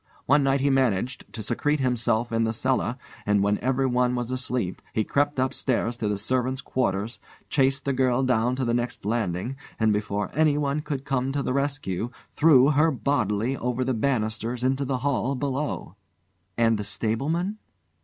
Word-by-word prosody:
One 145 Hz, +2 st, +4 dB
night 135 Hz, 0 st, +2 dB
he 140 Hz, 0 st, +3 dB
managed 130 Hz, -2 st, 0 dB
to 110 Hz, -, -6 dB
secrete 145 Hz, +7 st, 0 dB
himself 120 Hz, -2 st, +1 dB
in 115 Hz, 0 st, +1 dB
the 110 Hz, 0 st, 0 dB
cellar, 125 Hz, +1 st, 0 dB, 0.3 s
and 105 Hz, -1 st, +2 dB
when 100 Hz, +1 st, +1 dB
everyone 125 Hz, -1 st, +1 dB
was 120 Hz, 0 st, -2 dB
asleep, 125 Hz, -7 st, -2 dB
he 110 Hz, -, +1 dB
crept 145 Hz, +5 st, 0 dB
upstairs 130 Hz, -2 st, 0 dB
to 110 Hz, -, -2 dB
the 105 Hz, -1 st, 0 dB
servants' 130 Hz, +5 st, 0 dB
quarters, 115 Hz, -3 st, -1 dB, 0.3 s
chased 135 Hz, -1 st, +1 dB
the 140 Hz, -, +1 dB
girl 130 Hz, 0 st, +2 dB
down 125 Hz, -1 st, +2 dB
to 130 Hz, 0 st, -1 dB
the 120 Hz, -, +1 dB
next 120 Hz, -3 st, -2 dB
landing, 110 Hz, +2 st, -1 dB, 0.2 s
and 110 Hz, -1 st, +3 dB
before 105 Hz, -1 st, -2 dB
anyone 150 Hz, -1 st, +2 dB
could 140 Hz, -2 st, -4 dB
come 135 Hz, -1 st, 0 dB
to 140 Hz, -1 st, -1 dB
the -, -, -1 dB
rescue 140 Hz, -7 st, -1 dB, 0.2 s
threw 145 Hz, -3 st, +5 dB
her 155 Hz, +3 st, +4 dB
bodily 125 Hz, -4 st, 0 dB
over 125 Hz, 0 st, -1 dB
the 130 Hz, 0 st, 0 dB
banisters 115 Hz, -1 st, -1 dB
into 135 Hz, +2 st, +1 dB
the 130 Hz, -1 st, -1 dB
hall 135 Hz, -1 st, +1 dB
below." 135 Hz, -, -3 dB, 0.6 s
"And 115 Hz, -2 st, +3 dB
the -, -, -2 dB
stableman 160 Hz, -, -2 dB
125 Hz, 170 wpm, -25 LUFS, 115-135 Hz, 0.6 s, threw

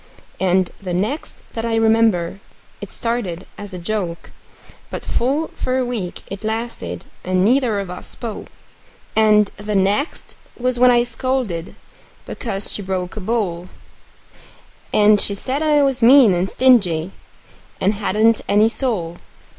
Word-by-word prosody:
And 185 Hz, -1 st, +2 dB
the 180 Hz, -3 st, -3 dB
next 215 Hz, -, -3 dB
that 225 Hz, -, -4 dB
I 230 Hz, -1 st, 0 dB
remember, 220 Hz, -5 st, +2 dB, 0.4 s
it -, -, -8 dB
started 210 Hz, -7 st, -3 dB
in 205 Hz, -, -8 dB
a 185 Hz, -, -6 dB
joke; 175 Hz, -2 st, -4 dB, 0.6 s
But -, -, -6 dB
full 280 Hz, +7 st, 0 dB
for 255 Hz, 0 st, -2 dB
a 255 Hz, -, +1 dB
week 220 Hz, -8 st, -4 dB
it 195 Hz, +2 st, -8 dB
lasted, 220 Hz, -, -4 dB, 0.2 s
and 185 Hz, 0 st, +1 dB
neither 240 Hz, -3 st, +2 dB
of 195 Hz, -3 st, -5 dB
us 180 Hz, -, -8 dB
spoke. 225 Hz, -4 st, -7 dB, 0.7 s
And 210 Hz, -2 st, +4 dB
the 205 Hz, +1 st, -3 dB
next 200 Hz, -, 0 dB, 0.2 s
was 250 Hz, 0 st, -1 dB
when 250 Hz, 0 st, +7 dB
I 240 Hz, -1 st, +5 dB
scolded 240 Hz, -8 st, -3 dB, 0.5 s
because 200 Hz, -5 st, -4 dB
she -, -, -2 dB
broke 185 Hz, -2 st, -3 dB
a 215 Hz, -, -5 dB
bowl; 185 Hz, -5 st, -2 dB, 1.2 s
And 210 Hz, -1 st, +5 dB
she 200 Hz, -, +1 dB
said 260 Hz, +8 st, -3 dB
I 300 Hz, -2 st, +3 dB
was 270 Hz, -2 st, 0 dB
mean 240 Hz, -3 st, +7 dB
and 180 Hz, +2 st, 0 dB
stingy, 195 Hz, -10 st, +3 dB, 0.7 s
and 195 Hz, +3 st, +2 dB
hadn't 215 Hz, +2 st, +2 dB
any 210 Hz, +2 st, +4 dB
soul. 205 Hz, -10 st, -2 dB
215 Hz, 145 wpm, -20 LUFS, 185-240 Hz, 1.2 s, when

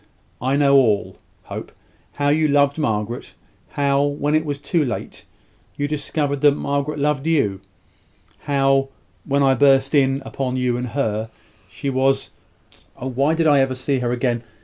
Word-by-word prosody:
I 130 Hz, +3 st, +1 dB
know 140 Hz, -1 st, +5 dB
all, 110 Hz, -6 st, +2 dB, 0.3 s
Hope; -, -, -8 dB, 0.4 s
how 145 Hz, 0 st, 0 dB
you 155 Hz, +1 st, +3 dB
loved 140 Hz, +1 st, +2 dB
Margaret; 110 Hz, -3 st, -3 dB, 0.3 s
how, 140 Hz, -1 st, +1 dB
when 145 Hz, +1 st, -1 dB
it 155 Hz, 0 st, +3 dB
was 145 Hz, -2 st, -3 dB
too 150 Hz, +3 st, 0 dB
late, 120 Hz, -5 st, -5 dB, 0.5 s
you 145 Hz, -, -1 dB
discovered 145 Hz, -1 st, -2 dB
that 145 Hz, -1 st, +5 dB
Margaret 140 Hz, +1 st, -2 dB
loved 145 Hz, 0 st, 0 dB
you; 105 Hz, -12 st, +1 dB, 0.8 s
how, 135 Hz, -1 st, +1 dB, 0.4 s
when 140 Hz, 0 st, +1 dB
I 135 Hz, -1 st, +4 dB
burst 135 Hz, +1 st, +3 dB
in 135 Hz, -1 st, +2 dB
upon 130 Hz, -2 st, -3 dB
you 125 Hz, -1 st, 0 dB
and 125 Hz, +1 st, -3 dB
her, 110 Hz, -3 st, -2 dB, 0.4 s
she 140 Hz, +7 st, -4 dB
was 135 Hz, +1 st, +1 dB, 0.7 s
(Oh, 130 Hz, -, -5 dB
why 140 Hz, +5 st, +1 dB
did 165 Hz, 0 st, +1 dB
I 145 Hz, -2 st, +5 dB
ever 135 Hz, -1 st, +1 dB
see 130 Hz, +1 st, -1 dB
her 120 Hz, -1 st, -1 dB
again?) 120 Hz, -1 st, -1 dB
140 Hz, 160 wpm, -21 LUFS, 130-145 Hz, 0.8 s, know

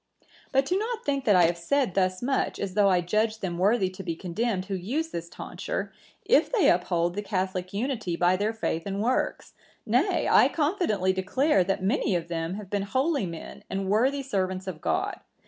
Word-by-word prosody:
"But 270 Hz, 0 st, +3 dB
do 365 Hz, +6 st, +1 dB
not 455 Hz, +1 st, -3 dB
think 275 Hz, -2 st, -1 dB
that 205 Hz, -, +5 dB
I 180 Hz, -, +6 dB
have 170 Hz, +1 st, +2 dB
said 260 Hz, +3 st, +1 dB
thus 185 Hz, +1 st, 0 dB
much, 270 Hz, +2 st, 0 dB
as 195 Hz, -2 st, -3 dB
though 200 Hz, 0 st, +4 dB
I 180 Hz, -2 st, +3 dB
judged 215 Hz, +5 st, 0 dB
them 175 Hz, -3 st, -3 dB
worthy 200 Hz, +1 st, +3 dB
to 185 Hz, +1 st, -8 dB
be 170 Hz, -3 st, -3 dB
condemned 190 Hz, +3 st, -2 dB
who 195 Hz, -, -5 dB
use 250 Hz, -, -2 dB
this 170 Hz, -, -6 dB
tonsure, -, -, -5 dB, 0.3 s
if -, -, +4 dB
they 465 Hz, -7 st, +4 dB
uphold 175 Hz, -1 st, +1 dB
the 205 Hz, -, -3 dB
catholic 185 Hz, -2 st, -2 dB
unity 215 Hz, -4 st, -2 dB
by 175 Hz, +2 st, +3 dB
their 205 Hz, +3 st, 0 dB
faith 185 Hz, -7 st, -3 dB
and 195 Hz, 0 st, -3 dB
works; 255 Hz, +3 st, -1 dB, 0.3 s
nay, 260 Hz, -, +2 dB
I -, -, +6 dB
confidently 290 Hz, -, 0 dB
declare, 195 Hz, -, +2 dB
that 195 Hz, 0 st, -1 dB
many 205 Hz, -1 st, +1 dB
of 170 Hz, -1 st, -3 dB
them 165 Hz, +1 st, -2 dB
have 205 Hz, -2 st, -9 dB
been 205 Hz, -1 st, 0 dB
holy 260 Hz, -, 0 dB
men 165 Hz, -1 st, -8 dB
and 195 Hz, 0 st, -2 dB
worthy 260 Hz, +7 st, +2 dB
servants 190 Hz, -6 st, -2 dB
of 180 Hz, -5 st, -6 dB
God. -, -, -1 dB
195 Hz, 200 wpm, -27 LUFS, 185-260 Hz, 0.3 s, I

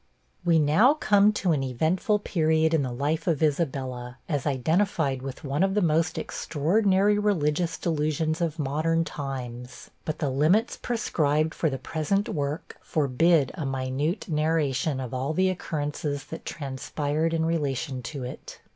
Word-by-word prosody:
We 170 Hz, -2 st, +4 dB
now 160 Hz, -, +5 dB
come 210 Hz, -7 st, +4 dB
to 190 Hz, -4 st, 0 dB
an 150 Hz, -4 st, +1 dB
eventful 160 Hz, -, +1 dB
period 160 Hz, -4 st, +1 dB
in 160 Hz, -, +3 dB
the 130 Hz, -2 st, -2 dB
life 150 Hz, +7 st, -1 dB
of 160 Hz, -3 st, +1 dB
Isabella, 130 Hz, -5 st, -1 dB
as 145 Hz, -4 st, -1 dB
identified 145 Hz, 0 st, +1 dB
with 135 Hz, -1 st, -7 dB
one 140 Hz, +3 st, -1 dB
of 195 Hz, +1 st, +2 dB
the 210 Hz, -, +3 dB
most 160 Hz, 0 st, +1 dB
extraordinary 195 Hz, +6 st, +1 dB
religious 170 Hz, -5 st, +1 dB
delusions 155 Hz, 0 st, -1 dB
of 165 Hz, -2 st, -1 dB
modern 160 Hz, +3 st, +1 dB
times; 130 Hz, -5 st, -6 dB
but 155 Hz, -1 st, -3 dB
the 145 Hz, -3 st, -1 dB
limits 160 Hz, -, +2 dB
prescribed 155 Hz, -, 0 dB
for 160 Hz, -, 0 dB
the 135 Hz, -, -3 dB
present 160 Hz, +9 st, -1 dB
work 145 Hz, 0 st, -3 dB
forbid 150 Hz, 0 st, +2 dB
a 165 Hz, -, -5 dB
minute 135 Hz, +6 st, -2 dB
narration 150 Hz, -3 st, 0 dB
of 130 Hz, -2 st, -5 dB
all 130 Hz, +4 st, -1 dB
the 185 Hz, +2 st, +3 dB
occurrences 145 Hz, -4 st, -3 dB
that -, -, -7 dB
transpired 145 Hz, +2 st, -2 dB
in 160 Hz, -1 st, 0 dB
relation 140 Hz, -4 st, -1 dB
to 135 Hz, +2 st, -6 dB
it. 125 Hz, -, -8 dB
155 Hz, 150 wpm, -26 LUFS, 135-170 Hz, -, now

